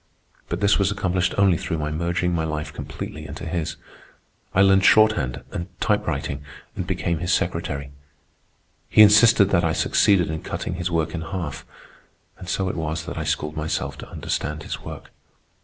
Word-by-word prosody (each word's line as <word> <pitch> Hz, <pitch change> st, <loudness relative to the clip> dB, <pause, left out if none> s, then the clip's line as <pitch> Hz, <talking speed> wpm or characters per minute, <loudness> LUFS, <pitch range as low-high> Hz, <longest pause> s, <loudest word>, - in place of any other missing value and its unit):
But -, -, -3 dB
this 100 Hz, 0 st, +4 dB
was 100 Hz, -, +3 dB
accomplished 95 Hz, -2 st, 0 dB
only 100 Hz, -3 st, +4 dB
through 80 Hz, -, -3 dB
my 75 Hz, -1 st, -2 dB
merging 85 Hz, +2 st, -1 dB
my 80 Hz, -2 st, 0 dB
life 75 Hz, -1 st, -4 dB
completely 75 Hz, -1 st, -7 dB
into -, -, -7 dB
his. 80 Hz, -1 st, -3 dB, 0.8 s
I 100 Hz, -, +4 dB
learned 95 Hz, -1 st, +5 dB
shorthand 100 Hz, -, +4 dB
and 85 Hz, -, -4 dB
typewriting, 70 Hz, 0 st, -1 dB, 0.3 s
and 90 Hz, -, -4 dB
became 85 Hz, -3 st, -1 dB
his 90 Hz, +2 st, -1 dB
secretary. 85 Hz, -7 st, -1 dB, 1.0 s
He 110 Hz, -, +8 dB
insisted 105 Hz, -1 st, +6 dB
that 85 Hz, -2 st, +3 dB
I 80 Hz, -1 st, +1 dB
succeeded 90 Hz, -2 st, +3 dB
in 80 Hz, -, -4 dB
cutting 90 Hz, -, -4 dB
his 90 Hz, 0 st, -2 dB
work 80 Hz, -2 st, -1 dB
in 85 Hz, -, -3 dB
half; 85 Hz, -3 st, -5 dB, 0.7 s
and 90 Hz, -, -8 dB
so 95 Hz, 0 st, 0 dB
it -, -, -2 dB
was 80 Hz, 0 st, -3 dB
that 85 Hz, -, -5 dB
I 80 Hz, -, -3 dB
schooled 75 Hz, +1 st, -2 dB
myself 75 Hz, 0 st, -2 dB
to -, -, -9 dB
understand 75 Hz, +2 st, -3 dB
his -, -, -5 dB
work. -, -, -9 dB
85 Hz, 175 wpm, -23 LUFS, 80-95 Hz, 1.0 s, He